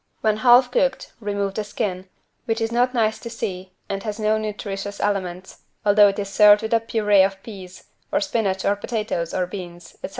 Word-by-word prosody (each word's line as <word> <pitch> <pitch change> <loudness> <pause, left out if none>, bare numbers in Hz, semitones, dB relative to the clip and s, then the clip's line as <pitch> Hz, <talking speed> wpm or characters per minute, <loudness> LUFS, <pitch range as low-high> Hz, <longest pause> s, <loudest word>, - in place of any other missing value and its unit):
When 215 -1 +1
half 245 +2 +5
cooked 265 +1 0
remove 200 -2 -2
the 215 - -3
skin, 190 -2 -4 0.4
which 225 -1 -1
is 225 0 -1
not 245 +2 +1
nice 220 -2 +1
to 235 - -8
see 185 -5 -6
and 195 0 -4
has 210 0 -5
no 215 0 +1
nutritious 205 -1 -5
elements, 185 -2 -3 0.2
although 205 0 +6
it 195 - -1
is 200 -1 -3
served 210 +1 +6
with 220 - -2
a 230 - +5
purée 210 -3 +3
of 195 0 -2
peas, 190 -4 -11 0.3
or - - +2
spinach 210 -9 -1
or 200 - +2
potatoes 205 -6 -3
or 180 - -1
beans, 175 -2 -9
etc. - - -4
205 Hz, 195 wpm, -22 LUFS, 195-225 Hz, 0.4 s, although